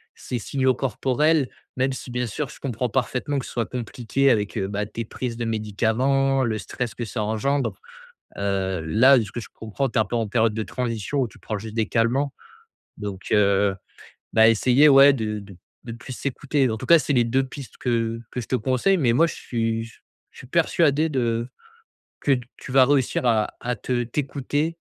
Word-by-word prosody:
ces 125 - -5
signaux 130 +2 +1
corporels, 135 +3 +1 0.3
même 130 +1 +1
si 130 -1 -7
bien 125 0 -1
sûr 145 +6 -3
je - - -14
comprends 125 -2 -2
parfaitement 130 +3 -1
que 130 - -6
ce - - -9
soit 120 -2 -1
compliqué 125 +3 -1
avec, 105 -4 +1
heu, 95 - -1
bah, 105 +1 -2
tes 115 +2 -5
prises 115 +1 -5
de 120 - -4
médicaments, 120 +5 +1
le 110 -2 -1
stress 115 +3 -5
que 120 - -4
ça 110 -1 -3
engendre, 130 +7 0 0.6
heu, 95 -2 -1
là, 120 +12 +5
de - - +1
ce 105 - -7
que - - -6
je - - -10
comprends, 110 +5 -3
tu 120 - -1
es - - +5
un - - -5
peu 120 - -3
en 115 -1 0
période 110 0 +1
de 110 0 -2
transition 120 +2 -2
ou 125 - 0
tu - - -18
prends 110 - -4
juste 110 +2 -8
des 110 -2 +1
calmants 125 +5 +1 0.6
donc, 100 -3 -7
heu, 100 -1 +3 0.6
bah, 110 0 +6
essayer, 125 +6 +5
ouais, 140 0 +8
de 110 -4 -3
de 100 -2 -12 0.3
de 115 - -6
plus 130 +3 -10
s'écouter, 140 +1 -1
en 110 - -1
tout - - -7
cas, 170 -1 +7
c'est 145 +2 -1
les 120 -3 +4
2 130 +3 +1
pistes 135 0 -9
que 115 -2 -1
que 125 - -3
je 115 - -9
te - - 0
conseille 130 - +2
mais 125 -8 +2
moi, 165 +8 +4
je - - -5
suis 115 -1 -2
je 115 - -15 0.4
suis - - -11
persuadé 160 0 +2
de 120 -4 -1 0.7
que 135 -3 +2 0.2
tu - - -10
vas 130 0 +6
réussir 135 -3 +1
à 110 -3 +2
à 125 0 -2
te 120 +3 -1
t'écouter 145 +5 -2
120 Hz, 205 wpm, -23 LUFS, 110-135 Hz, 0.7 s, ouais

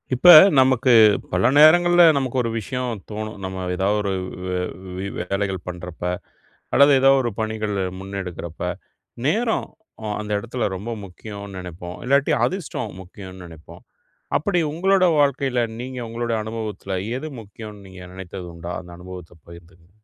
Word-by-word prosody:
இப்ப, 175 +8 +5 0.3
நமக்கு 130 -1 +4 0.4
பல 90 +6 +3
நேரங்கள்ல 175 +3 +7
நமக்கு 130 -2 -2
ஒரு 115 - -1
விஷயம் 120 -1 -4
தோணும். 110 0 -5
நம்ம 95 -1 -4
ஏதாவொரு 100 +2 0 0.3
வ் - - -4
வ 90 - -2 0.4
வி 95 +1 -4
வேலைகள் 95 +1 -2
பண்றப்ப, 90 -1 -8 0.7
அல்லது 140 +1 +6
ஏதாவது 135 0 +5
ஒரு 120 - -1
பணிகளை 110 -3 -2 0.2
முன்னெடுக்குறப்ப, 95 -4 -7 0.7
நேரம்! 225 +8 +1 0.4
அ - - -5
அந்த 105 0 -7
எடத்துல 120 +3 -3
ரொம்ப 105 +6 -6
முக்கியோன்னு 100 +1 -9
நெனைப்போம். 90 0 -8
இல்லாட்டி, 140 +2 +3
அதிர்ஷ்டம் 175 - -4
முக்கியோன்னு 95 0 -11
நெனைப்போம். 80 -2 -14 0.6
அப்படி 180 +3 0
உங்களோட 190 +3 +3 0.2
வாழ்க்கையில, 135 -3 +1 0.2
நீங்க 130 +1 -6
உங்களோட 115 0 -2
அனுபவத்துல, 110 -3 -5 0.2
எது 155 +3 -6
முக்கியோன்னு 105 -1 -11
நீங்க 95 -1 -12
நெனைத்தது 95 -1 -8
உண்டா? 85 +1 -6
அந்த 90 -1 -13
அனுபவத்த 90 -1 -10
பகிர்ந்துக்கங்க. 85 +1 -16
105 Hz, 135 wpm, -22 LUFS, 95-130 Hz, 0.7 s, நேரங்கள்ல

